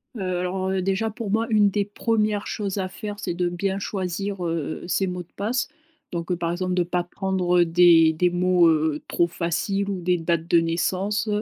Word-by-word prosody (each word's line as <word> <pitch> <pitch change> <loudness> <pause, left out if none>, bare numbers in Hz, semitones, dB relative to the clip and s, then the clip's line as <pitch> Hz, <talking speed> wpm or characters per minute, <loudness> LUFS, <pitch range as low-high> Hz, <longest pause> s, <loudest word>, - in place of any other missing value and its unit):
Heu, 205 - -5 0.2
alors, 185 +1 -2
heu, 190 -1 0
déjà 195 +4 0
pour 215 -1 -5
moi 225 +1 +1
une 210 -2 +4
des 205 0 0
1res 210 -1 0
choses 200 -2 -3
à 190 -1 -1
faire, 205 +2 -6
c'est 180 -4 -3
de 175 0 0
bien 190 +3 -2
choisir, 190 -1 -3
heu, 165 -2 -3
ses 190 +1 +1
mots 180 -1 -4
de 170 - -32
passe. 230 +5 -1 0.4
Donc 170 +1 -4
par 170 0 -2
exemple 180 +1 -2
de 180 - +2
pas 175 0 -1
prendre, 185 -1 -1
heu, - - +4
des 165 -1 +6
des 180 +3 +2
mots, 175 0 +3
heu, 155 -1 +1
trop 175 - +2
faciles 195 +4 -1
ou 190 -2 -3
des 180 +1 +1
dates 165 0 -1
de 170 -1 +5
naissance. 190 +6 -1
185 Hz, 205 wpm, -24 LUFS, 175-200 Hz, 0.4 s, des